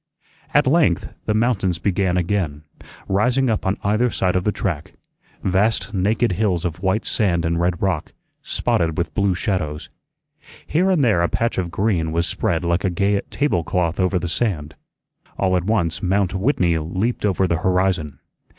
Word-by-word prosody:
At - - +4
length - - +2
the 105 - +1
mountains 110 -6 +1
began 95 -1 0
again, 85 -5 -1 0.4
rising 125 +6 +2
up 110 - -1
on 95 - 0
either 110 +5 +2
side 90 -5 0
of 90 - 0
the 105 - +2
track; 85 -7 -3 0.5
vast, 100 +3 +1
naked 105 +4 +1
hills 90 -3 0
of 85 0 -3
white 95 +4 0
sand 85 -7 +1
and 85 0 0
red 85 -1 0
rock, 95 -6 -1 0.3
spotted 80 -2 0
with 85 - -2
blue 100 -3 +1
shadows. 85 -6 -3 0.7
Here 180 +5 +1
and 175 -7 +3
there 105 -8 +3
a 85 - +1
patch 115 +4 0
of 90 -2 -2
green 85 -3 0
was 85 +1 +1
spread 85 0 -1
like 85 +2 +1
a 95 - +2
gay 100 +3 +1
table 140 - 0
cloth 85 +1 -1
over 95 0 +2
the 90 - -2
sand. 80 -4 -2 0.6
All 95 -1 +1
at 90 -1 0
once 85 -8 0
Mount 95 0 +1
Whitney 95 - +1
leaped 95 +10 -2
over 95 -2 +2
the 85 -2 +1
horizon. 90 -4 0
95 Hz, 170 wpm, -21 LUFS, 85-105 Hz, 0.7 s, At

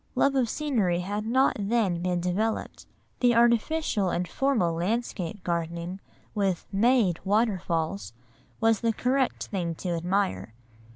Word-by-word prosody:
Love 275 - +3
of 255 -4 +1
scenery 215 - 0
had 205 +4 -3
not 260 +3 +3
then 200 -4 +1
been 180 0 0
developed. 195 +6 -2 0.3
The 245 -1 +4
artificial 235 - +2
and 175 0 -1
formal 235 -11 +1
landscape 190 0 -2
gardening, 170 +2 -3 0.3
with 195 -4 0
"made" 210 -3 +3
waterfalls, 195 -4 0 0.5
was 225 -2 +3
the 230 -1 +1
correct 260 +3 0
thing 175 -5 -2
to 180 - -5
admire. 170 - -1
200 Hz, 125 wpm, -27 LUFS, 175-235 Hz, 0.5 s, The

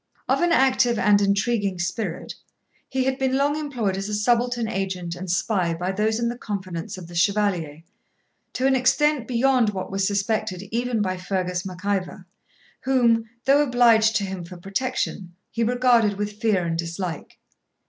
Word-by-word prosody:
Of - - +2
an 345 0 +2
active 260 -5 +3
and 205 -1 +4
intriguing 200 -1 +1
spirit, 180 +5 -3 0.6
he 265 -1 0
had 265 +1 -1
been 265 0 +1
long 285 +1 +2
employed 250 -10 -2
as 195 +2 -4
a 210 - -1
subaltern 240 +2 +1
agent 190 -4 -3
and 185 +1 -7
spy 180 -2 0
by 180 +3 -2
those 215 +3 0
in 235 - 0
the 240 - -2
confidence 185 -5 -5
of 185 - -8
the 175 - -12
Chevalier, 175 -5 0 0.7
to 255 - -1
an 270 0 +4
extent 265 0 +2
beyond 250 -2 +3
what 190 -2 -5
was 195 0 0
suspected 200 -2 -1
even 235 -1 0
by 185 -1 -2
Fergus 180 0 -2
Mac 185 +1 -9
Ivor, 190 -2 -2 0.5
whom, 235 -4 +2 0.2
though 280 +2 +5
obliged 235 -5 +4
to 205 - +1
him 190 -2 -5
for 175 +1 -10
protection, 195 -2 -3 0.2
he 230 - -1
regarded 240 -3 +3
with 210 +1 -5
fear 205 -6 +2
and 165 0 -2
dislike. 170 0 -5
210 Hz, 170 wpm, -23 LUFS, 185-245 Hz, 0.7 s, though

